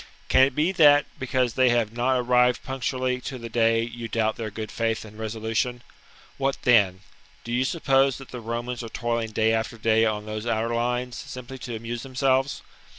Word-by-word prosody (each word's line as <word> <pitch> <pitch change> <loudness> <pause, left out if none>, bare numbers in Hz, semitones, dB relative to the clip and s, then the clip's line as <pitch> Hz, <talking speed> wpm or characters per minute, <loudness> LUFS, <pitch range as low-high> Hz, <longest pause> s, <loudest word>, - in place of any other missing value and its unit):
Can - - +5
it 135 0 +4
be 160 +5 +2
that, 145 -5 +6
because 130 -2 0
they 130 +1 +4
have 115 -2 +1
not 125 +2 +1
arrived 125 0 +3
punctu 135 0 -2
ally 130 0 -1
to 130 +1 -6
the 115 -1 -7
day, 115 0 +2
you 120 0 -6
doubt 110 -1 0
their 115 -2 -4
good 110 +1 -6
faith 115 -1 -1
and 105 0 -13
resolution? 110 +2 -2 0.6
What 135 0 0
then? 100 -6 +4 0.4
Do 120 - -7
you 125 +2 +2
suppose 135 -3 +2
that 135 - -12
the 125 - -7
Romans 120 +2 -4
are 115 - -7
toiling 115 0 -2
day 110 +1 +2
after 110 +1 -2
day 110 0 +3
on 105 -1 0
those 110 +1 -5
outer 115 0 0
lines, 125 +1 -1
simply 130 +1 -8
to 120 -1 -6
amuse 115 +1 -5
themselves 135 +1 0
120 Hz, 195 wpm, -25 LUFS, 115-130 Hz, 0.6 s, that